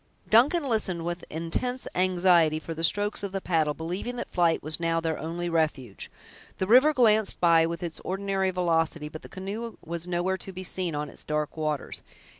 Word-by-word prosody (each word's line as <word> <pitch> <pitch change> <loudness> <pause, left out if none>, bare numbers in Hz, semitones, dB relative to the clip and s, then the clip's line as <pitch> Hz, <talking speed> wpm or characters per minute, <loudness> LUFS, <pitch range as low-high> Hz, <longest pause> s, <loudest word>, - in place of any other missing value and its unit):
Duncan 280 +8 +5
listened 190 -8 -1
with 175 +1 -4
intense 170 +11 -2
anxiety 175 -3 +3
for 165 - -6
the 165 +1 -6
strokes 205 +6 +2
of 200 -1 -4
the 195 - -1
paddle, 160 -5 0
believing 180 +9 -4
that 245 - -6
flight 170 -2 +2
was 155 +2 +1
now 165 0 +1
their 160 -1 -2
only 170 +2 -4
refuge. 150 - -2 0.5
The 190 - 0
river 255 +9 +6
glanced 220 -6 +3
by 165 -2 +5
with 170 +1 -5
its 170 -2 -4
ordinary 195 0 -1
velocity, 165 -4 0
but 155 0 -9
the - - -12
canoe 210 +5 -6
was 170 +1 -4
nowhere 180 +2 0
to 195 - -5
be 185 0 -7
seen 180 -3 -3
on 150 0 -2
its - - -11
dark 150 -1 -2
waters. 155 -3 -3
175 Hz, 190 wpm, -27 LUFS, 160-195 Hz, 0.5 s, river